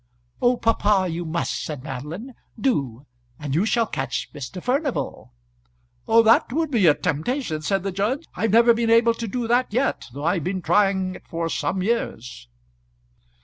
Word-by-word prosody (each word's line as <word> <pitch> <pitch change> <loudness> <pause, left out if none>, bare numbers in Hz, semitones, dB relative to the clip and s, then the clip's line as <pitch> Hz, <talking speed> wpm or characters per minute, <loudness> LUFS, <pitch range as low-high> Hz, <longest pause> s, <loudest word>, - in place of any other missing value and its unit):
"Oh, 245 0 +3
papa, 210 -4 +2
you 170 0 -4
must," 170 +1 -2
said 145 -5 -6
Madeline. 155 - -7 0.3
"Do 140 - -1 0.3
and 145 -2 -5
you 180 +8 +2
shall 230 0 +2
catch - - -4
Mr. 145 +5 -7
Furnival." 260 - -2 0.8
"That 225 +1 +5
would 315 +2 -1
be 215 -9 +3
a 150 - +6
temptation," 170 - -2
said 195 +4 0
the 195 - -2
judge. 215 - -1
"I've 225 - -1
never 235 +3 +6
been 230 0 0
able 230 0 +5
to 230 0 -5
do 240 +2 -3
that 245 +1 +2
yet, 255 +5 -1
though 140 +4 -7
I've 170 0 +1
been 185 +1 -3
trying 195 -2 +2
it - - -22
for 165 0 -3
some 170 +5 -1
years." 125 - -3
195 Hz, 165 wpm, -23 LUFS, 160-235 Hz, 0.8 s, a